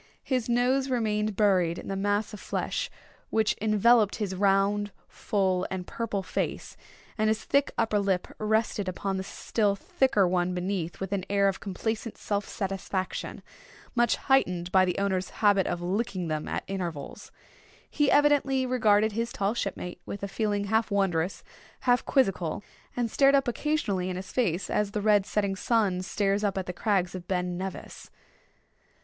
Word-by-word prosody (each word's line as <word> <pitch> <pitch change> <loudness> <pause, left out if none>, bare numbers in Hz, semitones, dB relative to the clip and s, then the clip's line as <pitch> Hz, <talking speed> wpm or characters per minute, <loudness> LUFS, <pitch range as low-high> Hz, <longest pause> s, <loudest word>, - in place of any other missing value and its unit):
His 255 -3 -1
nose 255 +3 +2
remained 215 -4 0
buried 185 -5 +3
in - - -8
the 195 - -2
mass 205 +2 0
of 210 - -7
flesh - - -2 0.4
which 220 -1 +2
enveloped 215 0 +4
his 205 -4 -3
round, 200 +2 +2 0.2
full, 190 -4 0
and 185 -1 -4
purple 210 -3 -3
face; - - -3 0.4
and 215 - +3
his 220 0 0
thick 280 0 +2
upper 220 -2 +2
lip 195 -3 0
rested 215 -2 0
upon 195 +1 -3
the 190 - -3
still 205 +1 0
thicker 265 - +2
one 180 0 0
beneath 180 -2 -3
with 195 0 -4
an 195 -2 -1
air 200 0 +3
of 195 - -1
complacent 220 +3 -4
self 205 -1 -2
satisfaction, 195 -1 -4 0.5
much 240 -2 +3
heightened 180 -10 +1
by 190 -1 +5
the 180 - -1
owner's 190 -2 0 0.2
habit 200 -2 +5
of 175 - -3
licking 185 -2 -2
them 155 -1 -2
at - - -3
intervals. 175 -7 -5 0.6
He 295 -2 +1
evidently 285 -2 +3
regarded 220 -4 +3
his 230 +2 -2
tall 200 +2 0
shipmate 180 -5 -4
with 200 - -7
a - - -1
feeling 205 0 -1
half 220 +2 +1
wondrous, 190 -3 0 0.4
half 245 -1 +3
quizzical; 195 - +1 0.3
and 235 -2 0
stared 275 0 +5
up 275 -2 +2
occasionally 230 -8 -1
in 185 - -3
his 185 +1 -7
face 195 -8 0
as 210 -1 -1
the 210 - -1
red 205 -2 +4
setting 200 -2 0
sun 200 -3 +1
stares 200 +2 0
up 200 -2 0
at 190 - -2
the 180 - -5
crags 190 -3 0
of 180 -2 -7
Ben 180 -1 -1
Nevis. 190 +1 -7
200 Hz, 165 wpm, -28 LUFS, 185-220 Hz, 0.6 s, by